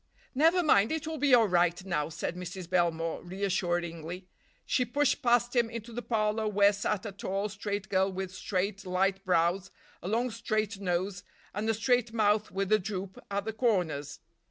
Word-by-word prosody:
"Never 325 +6 +4
mind, 220 -8 +4
it 320 -1 -2
will 315 -1 -4
be 275 -2 +6
all 230 -3 +5
right 175 0 +2
now," 160 -5 -1
said 165 - -4
Mrs. 180 0 -6
Belmore 165 -2 0
reassuringly. 175 -2 -2 0.4
She 255 - +2
pushed 275 +3 +1
past 240 0 +2
him 235 -2 +3
into 230 0 -7
the 245 - -4
parlor 215 -2 0
where 205 0 +4
sat 200 0 -2
a 210 - -4
tall, 195 +1 -3
straight 205 -1 -4
girl 190 0 +2
with 190 0 -5
straight, 195 +1 -2
light 190 +1 0
brows, 180 +1 +1 0.3
a - - -6
long 235 +4 0
straight 215 -2 -2
nose, 180 0 -2 0.3
and 210 +3 -2
a 225 - +2
straight 240 +1 +1
mouth 215 -1 +2
with 195 +1 -2
a 215 - +5
droop 190 -1 -5
at 200 0 -2
the 220 - -3
corners. 175 - -1
200 Hz, 180 wpm, -30 LUFS, 185-225 Hz, 0.4 s, be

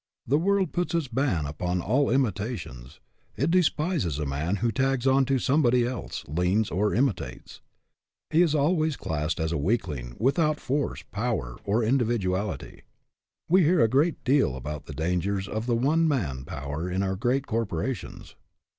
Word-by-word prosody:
The 140 +5 +2
world 195 0 +1
puts 175 -1 -1
its 165 -4 0
ban 120 - 0
upon 90 +5 -2
all 130 +11 +1
imitations. 100 - -2 0.4
It 145 +6 +1
despises 160 - +1
a 75 - -2
man 75 +7 -1
who 115 +3 0
tags 135 0 0
on 135 0 +4
to 135 +1 +1
somebody 125 -2 +3
else, 125 0 -5
leans 90 +8 +1
or 105 +4 +1
imitates. 130 -1 -2 0.7
He 160 +2 +4
is 160 -4 +3
always 155 +1 +2
classed 80 +2 -2
as 80 0 -1
a 85 - -1
weakling, 70 - -2
without 150 +4 +2
force, 140 +2 -2
power, 100 - -2
or 110 +4 +1
indi 125 +2 +2
viduality. 100 -3 -2 0.7
We 185 +3 +5
hear 170 +1 +4
a - - +5
great 145 +8 +1
deal 130 - +2
about 75 +3 -6
the - - -7
dangers 90 +4 -1
of 110 +3 -4
the 120 - +2
one 155 +7 +2
man 70 - -1
power 75 +5 -4
in 95 +2 -1
our 95 0 -1
great 125 +7 0
corpo 115 -6 -2
rations. 100 +3 -5
115 Hz, 165 wpm, -26 LUFS, 90-140 Hz, 0.7 s, We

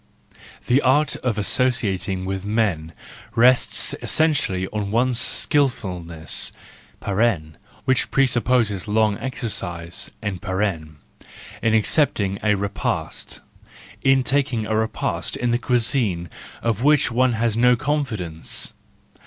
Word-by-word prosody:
—The 130 +4 +3
art 140 +3 +2
of 120 -4 -2
associating 100 -5 0
with 95 0 -3
men 100 -7 -1 0.4
rests 125 +2 +3
essentially 135 - +1
on 105 -2 -3
one's 120 +3 +1
skilfulness 90 - 0 1.3
(which 130 -1 +1
presupposes 120 -6 +1
long 105 -1 +2
exercise) 95 -10 -3
in 100 -4 -3 1.2
accepting 110 -3 +1
a 105 -1 +2
repast, 100 0 -3 0.6
in 135 -1 +4
taking 130 -4 0
a 110 - -1
repast 110 0 -2
in 120 -1 0
the 120 - +1
cuisine 115 - +1 0.3
of 115 -1 0
which 145 -1 +3
one 125 +1 +2
has 115 -1 0
no 125 +1 +5
confidence. 115 - -2
115 Hz, 100 wpm, -22 LUFS, 100-130 Hz, 1.3 s, no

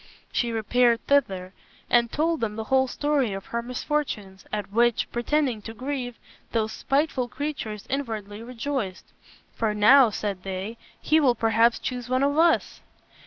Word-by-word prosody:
She 240 -1 0
repaired 235 +1 +2
thither 190 -10 +1 0.3
and 235 -1 +3
told 320 +1 0
them 215 -2 -1
the 220 - -3
whole 265 0 +4
story 280 -4 0
of 195 0 -6
her 235 - 0
misfortunes, 240 -6 -3
at 210 -2 -4
which, 235 +1 +2
pretending 245 -1 0
to 225 +2 -8
grieve, 250 -1 -4 0.4
those 220 -1 0
spiteful 275 -3 0
creatures 250 -7 -5
inwardly 220 -6 -4
rejoiced. 235 -4 -4 0.5
"For 220 -2 -1
now," 245 +4 +7
said 200 -3 -3
they, 195 +4 -5 0.2
"he 315 - +3
will 260 -5 +3
perhaps 225 +1 +3
choose 250 -1 -5
one 255 +1 +2
of 285 +1 +2
us." 335 0 +2
235 Hz, 150 wpm, -25 LUFS, 215-275 Hz, 0.5 s, now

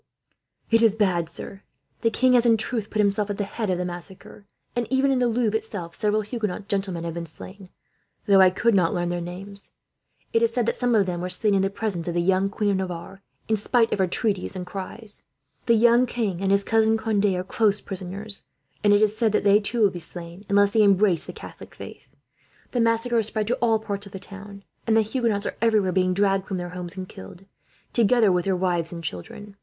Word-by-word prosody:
"It 225 0 +5
is 225 -3 +4
bad, 180 -6 +1
sir. 195 +3 -5 0.4
The 230 - +3
king 255 +3 +2
has, 245 -2 +5
in 225 -1 +5
truth, 220 -1 -2
put - - -4
himself 200 +1 0
at 205 - -3
the 205 - -1
head 210 +1 -4
of 180 - +1
the 180 - -2
massacre; 180 +3 -9 0.3
and 240 -2 -1
even 270 +1 +2
in 260 - +2
the 245 - +2
Louvre, 230 -2 0
itself, 185 -7 -7
several 210 +2 0
Huguenot 210 -3 -4
gentlemen 195 -4 -2
have 170 -1 -4
been 170 0 -5
slain, 185 +4 -11 0.6
though 200 -3 +6
I 185 - +7
could 230 +5 +1
not 180 -4 +2
learn 175 -1 -1
their 175 0 -2
names. 195 +3 -8 0.6
It 230 - +3
is 230 -1 +3
said 240 -1 0
that - - 0
some 245 -2 +1
of 205 -3 +4
them 175 -2 -3
were 180 - -3
slain 205 +3 +1
in 195 - +3
the 195 - +1
presence 195 -5 -3
of 175 - -2
the 175 - +2
young 190 +2 +2
Queen 205 0 0
of 195 - +1
Navarre, 190 +1 -6 0.3
in 220 - +1
spite 230 +2 +2
of - - -1
her 190 - +4
entreaties 195 +1 -1
and 180 -1 -5
cries. 200 +3 -8 0.5
The 235 - +5
young 235 +2 +5
king 210 -7 -2
and 195 0 +1
his 200 0 +3
cousin 225 0 +3
Conde 220 -2 0
are 180 -2 0
close 205 +1 +1
prisoners; 195 +2 -5 0.4
and 205 -1 +5
it 205 +1 +4
is 215 0 +2
said 220 -2 +1
that - - +2
they, 200 +1 +5
too, 225 +3 -2
will 205 -2 +5
be 175 - -7
slain, 170 +3 -10
unless 200 0 +4
they 220 - +3
embrace 200 -3 +3
the - - -7
Catholic - - -12
faith. - - -12 0.6
"The 245 - -1
massacre 230 +1 +2
has 220 -2 +2
spread 220 -1 -2
to 245 - +2
all 225 -2 +2
parts 205 -2 -5
of 200 - -15
the 195 - -6
town, 200 +1 -11 0.2
and 225 0 +4
the 220 - +4
Huguenots 220 -2 -1
are - - -4
everywhere 215 -5 +3
being 185 0 +1
dragged 195 -1 +1
from 190 - -3
their 175 0 -5
homes 180 +1 -7
and 185 -1 -5
killed, 175 - -12 0.5
together 230 -2 +4
with 180 -1 +1
their 195 -1 +1
wives 175 -3 0
and 170 -1 -7
children. 195 - -7
200 Hz, 235 wpm, -24 LUFS, 185-220 Hz, 0.6 s, I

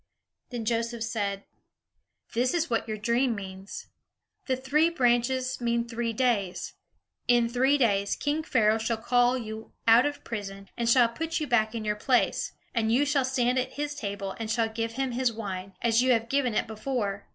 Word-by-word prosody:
Then 240 -3 -5
Joseph 230 0 -1
said, 205 -3 -2 0.9
"This 250 +6 +1
is 330 -5 0
what 230 0 0
your 215 -1 -3
dream 235 +3 +1
means. 190 -1 -8 0.6
The 260 - +2
three 295 +5 +2
branches 255 -2 +1
mean 235 0 0
three 235 0 -2
days. 220 -6 0 0.5
In 240 -1 +4
three 260 +4 +3
days, 200 -6 +2
king 295 +2 -1
Pharaoh 225 -8 +2
shall 225 +1 -1
call 245 +2 +2
you 220 -2 -7
out 235 +5 +7
of 290 0 -6
prison 195 -3 -6
and 235 -1 0
shall 240 0 +6
put 325 +9 -3
you 305 - -1
back 235 -4 +1
in 220 -1 -4
your 210 0 0
place; 245 +3 +1 0.2
and 225 -2 +1
you 265 +5 +3
shall 285 -1 +2
stand 255 -1 +1
at 255 - -3
his 290 0 -3
table, 200 -7 -4
and 225 -1 -4
shall 225 0 +1
give 225 +1 -3
him 265 +1 -1
his 250 0 +1
wine, 195 -4 -6
as 230 0 +4
you 255 0 +4
have 230 0 0
given 260 -4 +1
it - - +1
before. 215 -3 -3
235 Hz, 185 wpm, -27 LUFS, 220-255 Hz, 0.9 s, out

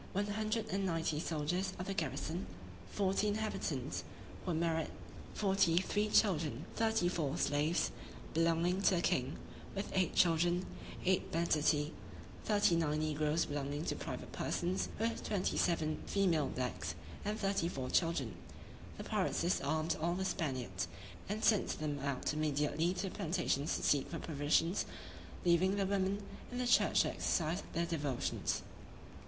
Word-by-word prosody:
one 200 +2 +1
hundred 215 +1 -1
and 195 +1 0
ninety 165 -4 0
soldiers 175 +4 -1
of 180 - -4
the 195 - -2
garrison; 160 +2 -2 0.4
forty 195 +1 +1
inhabitants, 155 - -2 0.4
who - - -4
were 160 - 0
married: 165 -1 +1 0.5
forty 190 -5 +3
three 205 +3 +1
children, 160 - +2
thirty 220 -5 +2
four 155 -6 -1
slaves, 150 +4 +1 0.4
belonging 165 +3 +2
to 195 - +4
the 170 - +1
king; 130 +4 +1 0.4
with 195 - -3
eight 185 -2 +1
children, 175 +1 +3 0.4
eight 185 0 +2
banditti, 155 -2 +2 0.5
thirty 205 -5 +4
nine 150 -2 +1
negroes 155 +1 +1
belonging 145 +2 -3
to - - -1
private - - -6
persons; 180 +2 -1
with 230 +2 -1
twenty 195 -3 0
seven 155 -3 +1
female 175 -7 +2
blacks, 125 -1 -3 0.3
and 210 +1 -2
thirty 195 -4 +1
four 130 -6 -3
children. 155 - +1 0.6
The - - -5
pirates - - 0
disarmed 160 -1 +1
all 170 +2 +1
the 190 +1 -1
Spaniards, 130 - -2 0.4
and 215 +2 -2
sent 215 -4 +3
them 150 -2 -2
out 140 0 -1
immediately 155 +3 +1
to 180 - -2
the - - -11
plantations 160 -4 0
to - - -3
seek 140 -2 +3
for 165 - -4
provisions, 160 +4 +1 0.6
leaving 180 +3 +4
the 200 -1 +1
women 200 +1 0 0.3
in 245 - -4
the 250 - 0
church 245 - +5
to - - 0
exercise 170 +3 0
their 170 0 +1
devotions. 145 -7 -1
170 Hz, 150 wpm, -35 LUFS, 150-190 Hz, 0.6 s, church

